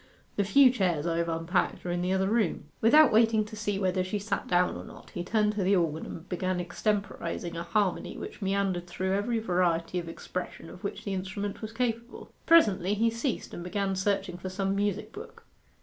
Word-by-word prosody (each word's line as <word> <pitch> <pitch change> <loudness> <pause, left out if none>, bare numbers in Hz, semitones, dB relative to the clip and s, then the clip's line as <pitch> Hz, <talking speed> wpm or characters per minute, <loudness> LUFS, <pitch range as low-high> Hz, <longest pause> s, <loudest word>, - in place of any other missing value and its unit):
The 205 - +2
few 260 +6 +6
chairs 180 -10 0
I 165 -1 0
have 170 0 0
unpacked 165 +3 -1
are 175 - -1
in 175 0 -1
the 180 +1 0
other 190 0 +2
room.' 210 -7 +1 0.2
Without 300 +8 +7
waiting 220 -1 +4
to 215 - -9
see 205 -1 -2
whether 185 -1 +1
she 185 +3 -2
sat 205 +2 -3
down 180 0 +2
or - - -6
not, - - -13
he 175 - -4
turned 210 +2 +1
to 210 -2 -1
the 195 +2 +4
organ 160 -3 0
and 170 +2 -8
began 185 0 -1
extemporizing 180 -1 -2
a 165 - -3
harmony 180 +2 -1
which - - -8
meandered 195 -2 0
through 190 +2 -2
every 215 +4 0
variety 180 -4 +1
of 170 -1 -6
expression 180 +2 -6
of 185 - -13
which 200 - -4
the 200 - -2
instrument 195 +2 -4
was 220 -1 -5
capable. 235 0 -3 0.2
Presently 205 - +5
he 230 +2 +2
ceased 230 +2 -3
and 175 - -6
began 195 +1 -1
searching 190 -2 -1
for 185 - -5
some 195 +1 -1
music 205 0 -1
book. - - -11
195 Hz, 205 wpm, -29 LUFS, 180-210 Hz, 0.2 s, Without